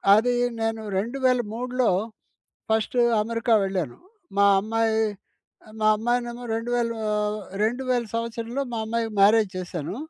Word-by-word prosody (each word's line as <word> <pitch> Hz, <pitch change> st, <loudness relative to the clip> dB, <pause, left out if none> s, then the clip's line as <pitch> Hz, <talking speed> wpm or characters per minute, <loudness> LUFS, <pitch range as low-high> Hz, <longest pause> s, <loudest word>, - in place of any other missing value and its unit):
అది 245 Hz, +3 st, +3 dB, 0.3 s
నేను 225 Hz, 0 st, -1 dB, 0.2 s
2003లో 250 Hz, +1 st, 0 dB, 0.8 s
first 220 Hz, +3 st, +1 dB, 0.2 s
America 230 Hz, +1 st, +1 dB
వెళ్ళాను. 185 Hz, -10 st, -2 dB, 0.4 s
మా 200 Hz, 0 st, +5 dB
అమ్మాయి, 220 Hz, +1 st, 0 dB, 0.8 s
మా 215 Hz, -, +4 dB
అమ్మాయినేమో 240 Hz, +1 st, -2 dB
2000 235 Hz, +1 st, -1 dB, 0.7 s
2000 245 Hz, +1 st, 0 dB
సంవత్సరంలో 230 Hz, +3 st, -3 dB
మా 230 Hz, -, -2 dB
అమ్మాయికి 225 Hz, -1 st, -2 dB
మ్యారేజ్ 210 Hz, 0 st, +5 dB
చేశాను. 175 Hz, +1 st, -5 dB
230 Hz, 100 wpm, -25 LUFS, 215-240 Hz, 0.8 s, మా